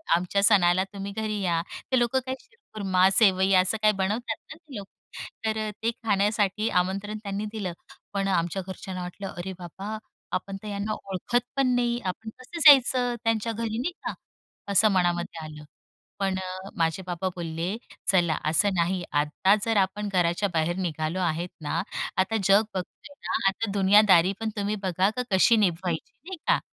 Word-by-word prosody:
आमच्या 180 +3 0
सणाला 185 -3 +5
तुम्ही 200 0 -5
घरी 215 -1 -2
या 170 -3 +1 0.3
ते 255 - +4
लोक 240 +2 0
काय 260 0 0
शिरखुरमा 195 - 0
सेवई 190 -2 +4
असं 185 +4 +3
काही 215 0 +5
बनवतात 215 +4 -1 0.2
ना - - -7
ते 310 -6 -14
लोक 200 -1 -6 0.6
तर 220 0 0 0.3
ते 230 - +2
खाण्यासाठी 210 0 +1
आमंत्रण 200 +4 -2
त्यांनी 200 +1 -3
दिलं 195 -6 -4 0.4
पण 195 0 0
आमच्या 175 0 0
घरच्यांना 185 -1 -6
वाटलं 180 +2 -6
"अरे 190 +2 -4
बाबा 195 +5 -6 0.4
आपण 195 0 -4
तर - - -7
यांना 205 +1 -2
ओळखत 195 +6 -2
पण 270 -1 +2
नाही 240 0 +1
आपण 220 +4 -4
कसं 295 +7 -8
जायचं 255 -3 +6
त्यांच्या 225 0 0
घरी" 225 0 -3
नाहीका 340 +9 -4 0.6
असं 210 +2 +5
मनामध्ये 175 -3 0
आलं 150 -1 -10 0.6
पण 195 -1 0 0.4
माझे 165 +2 0
बाबा 180 +1 -2
बोलले 170 +4 -3 0.3
"चला 170 -5 +2
असं 165 +6 +3
नाही. 175 +1 0
आता 150 +7 +2
जर 225 -2 +1
आपण 200 +2 0
घराच्या 180 +3 +1
बाहेर 165 +2 0
निघालो 165 -1 -2
आहेत 175 0 -1
ना 150 - -1 0.4
आता 190 +4 +1
जग 195 +3 +6
बघतोय 190 +9 -7
ना - - -2 0.2
आता 200 +1 -3
दुनियादारी 195 -2 +5
पण 225 -1 -2
तुम्ही 205 +1 -1
बघा 185 +2 +2 0.2
कशी 195 +5 +5
निभवायची." 175 -4 -1
नाही 380 -1 -6
का? - - +4
195 Hz, 160 wpm, -26 LUFS, 180-215 Hz, 0.6 s, जायचं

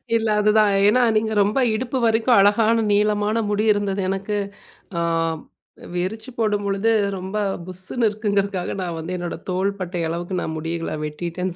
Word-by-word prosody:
இல்ல, 225 -1 +1
அதுதான். 210 0 +4 0.2
ஏன்னா, 250 +4 +4 0.2
நீங்க 220 0 0
ரொம்ப 210 +7 0 0.2
இடுப்பு 255 +3 -2
வரைக்கும் 225 +1 +3
அழகான 220 +3 +4
நீளமான 210 +2 +2
முடி 210 +1 +1
இருந்தது 200 -1 -1
எனக்கு. 195 +2 -2 0.6
அ - - 0 0.9
விரிச்சு 200 +8 -3
போடும் 210 -2 0
பொழுது 200 +3 +1 0.3
ரொம்ப 190 +3 -5 0.3
புஸ்ஸுன்னு 185 +6 -1
இருக்குங்குறதுக்காக 200 -3 -1
நான் 175 -2 -3
வந்து 165 +3 -4
என்னோட 175 -1 -4
தோள்பட்டை 185 -1 -2
அளவுக்கு 175 +2 -3
நான் 160 - -3
முடிகள 165 0 -3
வெட்டிட்டேன்னு 175 +4 -4
200 Hz, 140 wpm, -22 LUFS, 180-215 Hz, 0.9 s, அதுதான்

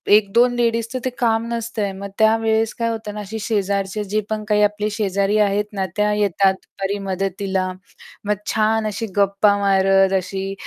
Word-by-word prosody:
1-2 230 +4 +3
लेडीजचं 230 +1 0
ते - - +1
काम 230 -1 +1
नसतं 230 -1 -3
आहे. 200 - -1
मग 195 +1 -7
त्यावेळेस 220 0 +2
काय 230 0 +1
होतं 220 -2 -5
ना 210 - -6
अशी 210 +2 -6
शेजारचे 200 -1 -1
जे 210 +2 -1
पण 215 -1 -2
काही 210 -1 +2
आपले 210 0 0
शेजारी 200 -1 0
आहेत 205 0 +2
ना, 195 -2 -1
त्या 210 -1 +2
येतात 200 -2 +2
दुपारी 195 +1 -5
मदतीला, 190 0 -2 0.5
मग 210 0 +1 0.2
छान 220 0 +1
अशी 215 +2 -3
गप्पा 200 +1 +3
मारत 195 -1 +3
अशी 190 +1 -4
210 Hz, 170 wpm, -20 LUFS, 195-220 Hz, 0.5 s, 1-2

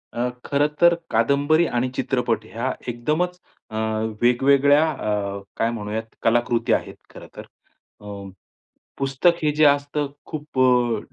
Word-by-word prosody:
अ, 120 +1 0 0.2
खरं 145 +1 +2
तर 170 0 +7 0.2
कादंबरी 140 +8 +3
आणि 120 +1 -1
चित्रपट 120 -6 -1
ह्या 115 +4 -3
एकदमच 155 +10 -1 0.3
अ, 110 - -9 0.5
वेगवेगळ्या 140 +5 +4
अ, 100 -5 -3 0.2
काय 115 - +1
म्हणूयात 110 -1 -4 0.2
कलाकृती 120 +1 +2
आहेत, - - -2
खरं - - -12
तर. - - -9 0.6
अ, - - -14 0.9
पुस्तक 135 +6 +2
हे 150 - +3
जे 155 0 +4
असतं 145 0 +2 0.2
खूप 150 -3 -6
अ, 125 -3 +3
130 Hz, 130 wpm, -22 LUFS, 115-145 Hz, 0.9 s, तर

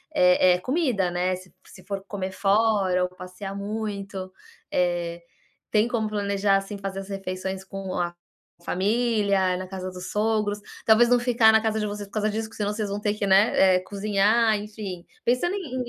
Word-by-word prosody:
eh 180 0 +5
eh, - - -3
comida, 250 - 0
né. 180 +1 0
Se 185 0 -14
se 185 - -15
for 195 -1 -5
comer 190 -2 -4
fora 195 -2 +2
ou 180 - -1
passear 185 +2 -8
muito, 200 -2 -5 0.4
eh, 175 -1 0 0.5
tem 215 +2 +3
como 220 -3 0
planejar, 200 -1 +1
assim, 195 +1 -5
fazer 195 -1 -5
as 195 - -11
refeições 190 0 -4
com 195 -1 -6
a 175 0 -2 0.5
família, 200 -2 +1
na 185 - -6
casa 185 -1 -6
dos 180 0 -8
sogros, 210 -1 0 0.3
talvez 230 +2 +6
não 245 0 +5
ficar 240 -2 +5
na 220 0 +4
casa 220 -1 0
de 210 - -1
vocês 205 -1 -5
por - - -26
causa 215 0 0
disso, 220 +1 -3
porque - - -14
senão 205 0 -1
vocês 210 -2 -3
vão 200 - -3
ter, 210 0 0
né, 190 -1 +5
eh, - - +3
que 185 - -13
cozinhar, 210 +3 +2
enfim, 205 -4 -7 0.2
pensando 250 +11 +1
em 260 -10 -3
200 Hz, 185 wpm, -25 LUFS, 185-220 Hz, 0.5 s, talvez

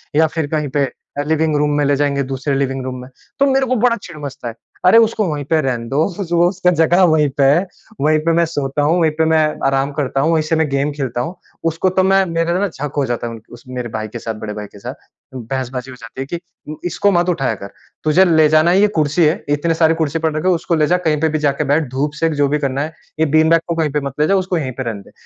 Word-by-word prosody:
या 160 +1 +5
फिर 155 -1 -3
कहीं 150 -2 -1
पे 140 - +3 0.3
अ, - - 0
लिविंग 160 0 +1
रूम 150 0 +1
में 145 - +2
ले 140 0 +2
जाएँगे 140 -1 0
दूसरे 135 +1 -3
लिविंग 135 -1 -1
रूम 130 -1 -5
में। 125 - -11 0.3
तो 280 - +5
मेरे 270 0 +2
को 255 - +1
बड़ा 235 +1 +3
चिढ़ 170 -3 -10
मचता 135 -3 -6
है। 115 - -5 0.3
अरे 185 +5 +7
उसको 220 -1 +2
वहीं 145 -1 -3
पे 160 +2 +2
रहने 125 -4 -2
दो 145 +4 +2 0.4
उसका 180 -1 +1
जगह 170 +2 +3
वहीं 150 -2 +3
पे 140 - +3
है, 150 +8 +4 0.4
वहीं 155 +2 +3
पे 165 - +3
मैं 170 +1 +3
सोता 145 -3 -2
हूँ, 165 +4 +2
वहीं 160 -1 +3
पे 160 - +3
मैं 160 - +4 0.3
आराम 135 +1 +1
करता 135 -2 -1
हूँ, 160 +4 +2
वहीं 155 -1 +2
से 160 +1 0
मैं 160 -1 +1
गेम 140 +2 0
खेलता 130 -4 -3
हूँ। 165 +9 -5 0.4
उसको 170 +4 0
तो 185 - +5
मैं 195 +1 +4
मेरा 165 0 0
ना 205 - +1
झक 145 -5 -6
हो 140 - +2
जाता 120 0 -2
है 115 - -6
उन 115 - -10
उस 120 - -13
मेरे 125 -1 -5
भाई 110 0 -4
के 120 - -7
साथ 115 0 -5
बड़े 105 - -5
भाई 105 0 -6
के 100 - -14
साथ। - - -7 0.4
बहसबाज़ी 130 +1 -5
हो - - -10
जाती 115 +3 -8
है - - -3
कि 170 +3 -4 0.3
उम, 155 - -5
इसको 190 +4 +1
मत 175 -1 +2
उठाया 135 -9 0
कर। 100 0 -10 0.3
तुझे 155 +5 +5
ले 160 -3 +4
जाना 155 +2 +4
है 185 - +4
ये 210 - +5
कुर्सी 155 +3 +2
है। 155 +2 +1
इतने 165 +3 0
सारे 160 0 +5
कुर्सी 155 +2 -2
पड़ 160 -1 0
रखे 160 - -1
उसको 170 -1 +1
ले 150 -1 +2
जा 180 - +3
कहीं 150 -1 +1
पे 160 - +2
भी - - +1
जाके 140 +2 0
बैठ 150 -3 0
धूप 140 +3 -1
सेक 165 -1 +2
जो 140 - +4
भी 150 +2 0
करना 140 -1 -1
है। 160 +1 -6 0.3
ये 160 - +4
बीन 160 0 +4
बैग 165 0 +4
को 170 - -1
कहीं 160 -3 0
पे 150 +1 -1
मत 135 - -6
ले 150 - +3
जा 195 - +3
उसको 185 -1 0
यहीं 135 -5 -2
पे 130 - -2
रहने 110 -4 -4
दे। - - -18
150 Hz, 280 wpm, -18 LUFS, 135-165 Hz, 0.4 s, अरे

